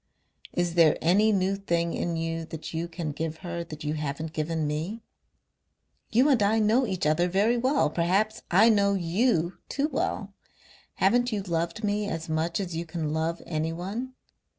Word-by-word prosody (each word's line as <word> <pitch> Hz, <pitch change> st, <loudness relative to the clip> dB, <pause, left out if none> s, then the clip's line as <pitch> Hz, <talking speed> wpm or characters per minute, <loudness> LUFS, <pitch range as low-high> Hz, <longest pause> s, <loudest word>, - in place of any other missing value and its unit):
"Is 175 Hz, -1 st, 0 dB
there 165 Hz, -3 st, +5 dB
any 200 Hz, +6 st, +4 dB
new 195 Hz, -1 st, +1 dB
thing 170 Hz, -4 st, -1 dB
in 170 Hz, -1 st, -2 dB
you 165 Hz, 0 st, -2 dB
that 160 Hz, 0 st, -8 dB
you 165 Hz, +1 st, -2 dB
can 165 Hz, -2 st, -4 dB
give 160 Hz, +1 st, -4 dB
her 170 Hz, -1 st, -3 dB
that 155 Hz, -3 st, -9 dB
you 150 Hz, 0 st, -1 dB
haven't 155 Hz, +1 st, -4 dB
given 155 Hz, 0 st, -1 dB
me? 165 Hz, +10 st, -3 dB, 1.1 s
You 250 Hz, +5 st, +4 dB
and 260 Hz, -6 st, +4 dB
I 205 Hz, +2 st, +3 dB
know 225 Hz, +4 st, +3 dB
each 190 Hz, -5 st, -2 dB
other 155 Hz, +4 st, +3 dB
very 200 Hz, +6 st, +2 dB
well; 260 Hz, -, +2 dB
perhaps 190 Hz, +6 st, +1 dB
I 200 Hz, +6 st, +6 dB
know 200 Hz, -2 st, +3 dB
YOU 175 Hz, 0 st, +1 dB
too 290 Hz, +2 st, 0 dB
well. -, -, -2 dB, 0.6 s
Haven't 245 Hz, +5 st, +3 dB
you 205 Hz, -3 st, -2 dB
loved 170 Hz, +3 st, -2 dB
me 205 Hz, 0 st, 0 dB
as 165 Hz, 0 st, -4 dB
much 160 Hz, +3 st, 0 dB
as 180 Hz, -4 st, -4 dB
you 165 Hz, -, -2 dB
can 160 Hz, -2 st, -3 dB
love 160 Hz, +2 st, -2 dB
anyone? 180 Hz, +11 st, -3 dB
175 Hz, 175 wpm, -27 LUFS, 165-210 Hz, 1.1 s, I